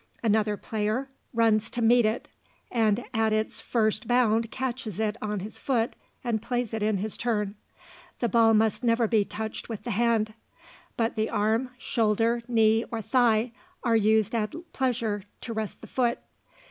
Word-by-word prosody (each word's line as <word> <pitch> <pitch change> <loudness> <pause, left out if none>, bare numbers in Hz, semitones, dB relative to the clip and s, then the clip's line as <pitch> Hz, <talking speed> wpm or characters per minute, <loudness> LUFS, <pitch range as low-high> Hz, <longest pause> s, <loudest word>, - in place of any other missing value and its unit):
Another 215 -1 +2
player 220 +6 -2 0.2
runs 225 -2 +2
to - - -4
meet 235 0 +5
it, 220 +2 -2 0.4
and 225 -1 +2
at 220 -1 +2
its 215 0 -1
first 215 -1 0
bound 230 -2 +3
catches 245 -6 -4
it 215 -1 0
on 210 -2 -2
his 210 +3 -8
foot 235 -4 0 0.3
and 230 -4 -1
plays 240 -1 -2
in 215 -1 +1
his 210 +2 -3
turn. 210 -4 -1 0.7
The 240 - +1
ball 225 -1 +5
must 220 +2 +2
never 230 -1 +3
be 215 -2 +3
touched 220 +3 -6
with 225 -3 -5
the 240 - -3
hand; 225 0 +1 0.6
but 230 0 0
the 220 -1 0
arm, 220 +4 +1
shoulder, 230 0 +1
knee, 225 -1 +4
or 230 - -3
thigh 240 -2 +3 0.3
are 230 -3 +3
used 220 0 +3
at 215 -3 -1 0.2
pleasure 235 -5 0 0.2
to 230 - -5
rest 220 -2 -4
the - - -9
foot. 240 -2 +1
225 Hz, 160 wpm, -27 LUFS, 215-235 Hz, 0.7 s, meet